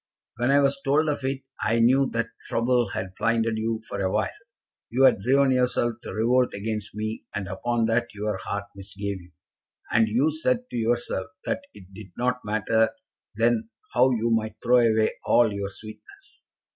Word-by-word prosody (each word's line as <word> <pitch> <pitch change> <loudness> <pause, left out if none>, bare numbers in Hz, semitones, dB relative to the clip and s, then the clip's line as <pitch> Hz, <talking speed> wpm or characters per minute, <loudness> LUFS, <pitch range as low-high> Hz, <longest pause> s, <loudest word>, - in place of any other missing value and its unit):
When 120 +1 +1
I 140 +1 +5
was 140 0 +1
told 150 +3 +2
of 145 -2 -2
it, 135 0 -2 0.2
I 110 +2 +1
knew 130 +4 +4
that 115 0 -1 0.2
trouble 120 -1 +1
had 95 0 -4
blinded 115 -1 +1
you 110 0 -1
for - - -4
awhile. 95 +1 0 0.6
You 130 +3 +2
had 115 - +5
driven 135 +4 +3
yourself 125 -2 +2
to - - -7
revolt 125 +3 +2
against 105 +1 -4
me, 110 +1 -4
and 100 -2 -3
upon 115 +5 -1
that 115 +2 0
your 105 -1 -2
heart 100 +1 -4
misgave 100 0 -5
you, 90 +1 -17 0.6
and 115 -1 +4
you 125 +9 +2
said 245 +11 0
to - - -6
yourself 115 -4 -1 0.2
that 275 +1 -1
it 95 0 -15
did 95 0 -10
not 125 +1 0
matter 110 +1 +2 0.5
then 115 0 +1 0.2
how 125 +3 +5
you 115 -2 0
might 110 -1 0
throw 125 +1 +5
away 110 -2 +3
all 115 -3 +4
your 100 -1 -3
sweetness. 400 - -12
115 Hz, 175 wpm, -25 LUFS, 105-125 Hz, 0.6 s, I